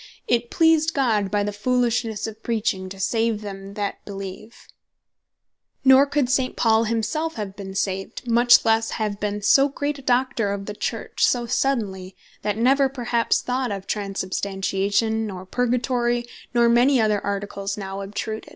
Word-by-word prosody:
"It 240 0 +1
pleased 325 -1 +3
God 220 -8 +1
by 205 +1 +1
the 205 0 -3
Foolishnesse 235 -1 0
of 220 0 -7
preaching, 215 -5 -1
to 195 +1 -10
save 225 +2 0
them 195 -1 -8
that 205 -1 -4
beleeve:" 195 +3 -8 1.3
Nor 265 +2 +7
could 285 -2 +1
St. 255 0 0
Paul 225 0 +3
himself 230 +9 -1
have 205 -4 -5
been 195 -2 -8
saved, 195 +4 -3
much 240 +1 +5
lesse 225 0 +2
have 210 -2 -2
been 205 0 -3
so 275 +6 +5
great 285 +1 -3
a - - -10
Doctor 245 -5 +1
of 200 0 -5
the 210 - -5
Church - - -3
so 240 -1 +1
suddenly, 200 -8 -1 0.3
that 210 0 -2
never 270 +4 +3
perhaps 240 -3 0
thought 250 -1 -1
of 195 -1 -5
Transsubstantiation, 200 +2 -1
nor 185 -2 -7
Purgatory, 240 +2 0 0.3
nor 235 -1 +3
many 245 +3 +4
other 210 -2 +1
Articles 200 0 -3
now 195 -1 -5
obtruded. 210 +2 -5
220 Hz, 155 wpm, -23 LUFS, 200-245 Hz, 1.3 s, Nor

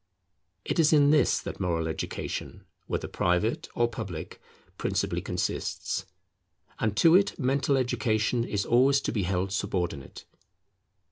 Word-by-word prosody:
It - - -1
is 160 -2 +5
in 145 -2 +5
this 150 -4 +3
that - - -7
moral 85 -4 -1
education, 80 - -5 0.2
whether - - -2
private 90 +6 0
or 120 - +3
public, 100 -9 -7 0.4
principally - - -1
consists; - - -3 0.7
and 110 -2 -1
to 165 -1 +6
it 195 +2 +4
mental 140 0 +1
education 115 -2 0
is 105 -4 -2
always 135 +3 +4
to - - -2
be 110 - -1
held 95 +1 -1
subordinate. 90 -7 -3
115 Hz, 130 wpm, -28 LUFS, 95-135 Hz, 0.7 s, to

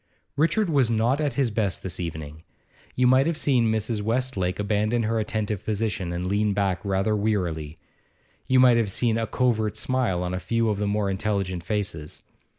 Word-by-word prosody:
Richard 165 +8 +2
was 140 -7 +2
not 115 +6 +1
at 145 -4 0
his 125 -2 +1
best 105 -6 -1
this 95 -2 -3
evening. 80 -3 -6 0.5
You 125 - +2
might 130 +3 +5
have 165 -2 -1
seen 125 -7 +2
Mrs. 110 0 -1
Westlake 110 -5 -1
abandon 105 +3 0
her 110 +1 0
attentive 105 -2 -2
position, 105 -4 -2
and 85 +1 -3
lean 100 +2 +1
back 95 -3 0
rather 100 +2 0
wearily; 85 -8 -1 0.7
you 130 -1 +4
might 125 -2 +6
have 115 -3 +1
seen 115 +3 +1
a 115 - -1
covert 110 -2 0
smile 115 -6 0
on 90 0 -3
a 90 - -2
few 115 +3 0
of 105 -2 -1
the 105 - 0
more 105 0 0
intelligent 95 -3 -2
faces. 100 -7 -4
105 Hz, 180 wpm, -25 LUFS, 95-120 Hz, 0.7 s, might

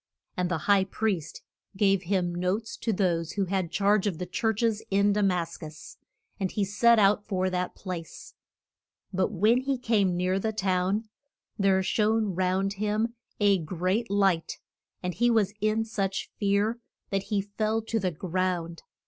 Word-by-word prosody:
And 180 -1 -1
the 175 - 0
high 200 -2 +4
priest 190 -5 -2 0.3
gave 195 -2 +3
him 180 -1 0
notes 185 +6 -2
to 230 - -2
those 170 -5 0
who 200 -2 0
had 185 -2 -1
charge 200 +3 +2
of 185 -6 -2
the 180 - -4
church 220 +4 -1
es 225 -2 +1
in 200 +1 +3
Da 210 - +1
mas 180 -4 0
cus, 155 -1 -10 0.4
and 190 -2 0
he 205 +1 -1
set 230 +4 +4
out 205 0 +4
for 185 -1 0
that 180 0 -2
place. 180 -4 -7 0.8
But 190 +2 +1
when 215 +5 +3
he 270 0 -1
came 205 -7 +1
near 185 +2 +1
the 220 +2 -1
town 195 +2 0 0.5
there 190 -1 +3
shone 215 0 +1
round 190 +2 0
him 215 +3 -1 0.3
a 200 -2 +4
great 185 +8 -1
light, 195 -4 +1 0.5
and 180 0 -2
he 240 +5 +2
was 210 -4 +2
in 215 +1 +1
such 195 -3 -3
fear 205 +3 +1 0.3
that 195 0 -1
he 210 -2 +1
fell 215 +2 -1
to 225 0 -1
the 185 -3 0
ground. 175 -1 -2
195 Hz, 165 wpm, -27 LUFS, 180-215 Hz, 0.8 s, high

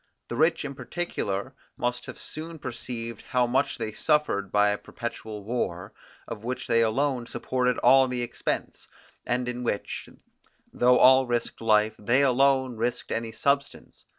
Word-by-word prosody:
The - - -3
rich 160 0 +2
in 140 - -4
particular 130 - -4 0.2
must 120 0 -2
have - - -8
soon 160 +2 -7
perceived 115 -4 -6
how 125 -1 +1
much 120 +2 0
they 110 - -3
suffered 110 - +1
by 105 0 +4
a 105 - 0
perpetual 110 -3 -7
war, 100 -5 -3 0.3
of 110 -2 -7
which 125 +2 -4
they 115 - +3
alone 125 +2 0
supported 125 0 -1
all 135 0 +6
the 125 -1 -2
expense, 120 - -4 0.4
and 125 0 0
in 125 0 -3
which, 115 -4 -3 0.6
though 125 +1 +4
all 130 0 +6
risked 120 -1 -2
life, 110 -1 +3
they 120 +6 +3
alone 130 -1 +3
risked 120 +2 -2
any 115 0 -2
substance. 140 +3 -2
125 Hz, 150 wpm, -26 LUFS, 115-130 Hz, 0.6 s, all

